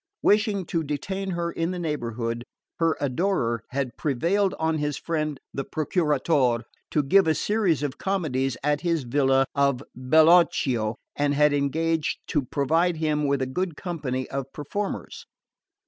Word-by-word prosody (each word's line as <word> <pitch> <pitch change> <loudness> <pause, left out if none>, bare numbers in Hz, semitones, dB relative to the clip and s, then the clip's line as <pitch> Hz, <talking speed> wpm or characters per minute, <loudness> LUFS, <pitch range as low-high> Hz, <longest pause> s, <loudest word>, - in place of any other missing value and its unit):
Wishing 210 -2 +3
to 165 0 -1
detain 190 +7 -3
her 170 -1 -2
in 165 0 -2
the 180 - -3
neighbourhood, 120 -8 -3 0.4
her 165 -1 +2
adorer 130 - 0
had 130 -2 -3
prevailed 170 +8 +1
on 160 0 0
his 150 -1 -1
friend 155 -4 -2
the 135 - -2
Procuratore 150 -6 +1 0.3
to 150 - +1
give 190 +6 +4
a 160 - +3
series 200 -9 +1
of 140 -2 -3
comedies 135 -10 -1
at 150 0 +1
his 170 -4 0
villa 135 +1 +3
of 140 -2 +1
Bellocchio 130 -5 +4 0.2
and 145 0 +1
had 150 0 +4
engaged 160 +3 0
to 150 - +2
provide 160 +6 +1
him 150 -2 0
with 140 -1 +1
a - - 0
good 165 +4 -3
company 140 -8 -3
of 135 0 -4
performers. 195 +8 -5
150 Hz, 145 wpm, -25 LUFS, 135-170 Hz, 0.4 s, give